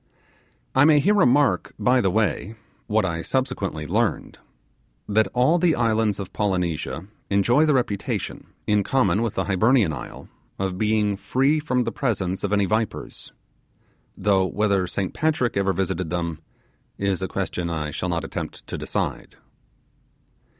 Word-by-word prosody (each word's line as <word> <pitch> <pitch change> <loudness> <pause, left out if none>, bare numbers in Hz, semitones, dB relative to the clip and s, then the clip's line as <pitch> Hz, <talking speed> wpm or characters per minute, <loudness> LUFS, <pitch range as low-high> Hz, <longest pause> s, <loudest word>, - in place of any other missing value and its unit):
I 130 - +5
may 150 0 +6
here 200 +9 +3
remark 145 -7 +3
by 125 0 +3
the 95 - +2
way 110 +2 0 0.3
what 105 -1 +2
I 85 -2 -2
subsequently 95 - -2
gleamed - - -1 0.7
that 110 +1 +3
all 130 +8 +3
the 170 -2 +3
islands 110 -3 +1
of 95 - -6
Polynesia 90 -4 -1 0.2
enjoy 120 +10 +3
the 150 - +3
reputation, 115 -6 -2 0.2
in 105 -1 +3
common 105 -3 +2
with 115 -3 -2
the - - 0
Hibernian 100 -1 +3
isle, 65 - -8 0.3
of 95 -1 -3
being 105 -2 +1
free 130 +10 +1
from 125 -5 0
the - - -2
presence 95 -8 -2
of 100 - -1
any 100 -1 +3
vipers; 110 +2 -3 0.9
though 95 -2 +2
whether 100 -2 +1
Saint 95 +1 -3
Patrick 155 -6 0
ever 100 0 +2
visited 90 -2 -2
them, 85 -2 -3 0.6
is 100 -2 -1
a 95 - -1
question 90 -3 -3
I 75 -2 -3
shall 90 - -3
not 85 -1 -1
attempt - - -6
to - - -6
decide. - - -3
105 Hz, 150 wpm, -23 LUFS, 95-125 Hz, 0.9 s, may